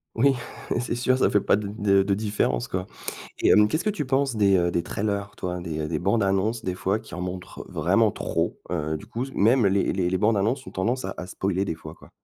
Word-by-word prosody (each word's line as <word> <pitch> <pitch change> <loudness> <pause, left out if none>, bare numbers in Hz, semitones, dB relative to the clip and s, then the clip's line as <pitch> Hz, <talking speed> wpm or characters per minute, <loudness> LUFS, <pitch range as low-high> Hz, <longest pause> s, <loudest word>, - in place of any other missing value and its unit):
Oui, 135 +4 +4 0.5
c'est 120 - -2
sûr, 130 +1 +2
ça - - +3
fait 105 - +3
pas - - +3
de 105 0 -3
d 100 -2 +3
de 100 +1 +1
différence 100 - 0
quoi. 90 0 -3 0.6
Et - - +3
hem, 105 0 +6
qu'est-ce 155 +9 -1
que 215 - +2
tu 155 -9 -3
penses 135 -1 +1
des, 100 -2 +4
heu, 85 -1 +2
des 85 - 0
trailers, 100 +2 -3
toi? 90 0 -3
Des, 80 -3 -4
heu, 75 - -2
des 80 -1 -1
bandes 100 +6 +1
annonces 100 +4 0
des 90 - -1
fois 95 +3 0
qui 110 - -11
en 90 - -5
montrent 90 0 -6
vraiment - - +2
trop. - - -2
Heu, 80 -3 -1
du 75 - -10
coup 115 +3 -4
s 135 - -9
même 115 +2 +4
les 100 0 +2
les 90 -2 0
les 95 +1 0
bandes 105 +2 +3
annonces, 120 +7 0
ont - - -7
tendance 120 +7 -1
à 95 - -2
à 90 - -5
spoiler 95 +1 -1
des 80 - -2
fois, - - -10
quoi. - - -18
100 Hz, 255 wpm, -25 LUFS, 90-115 Hz, 0.6 s, hem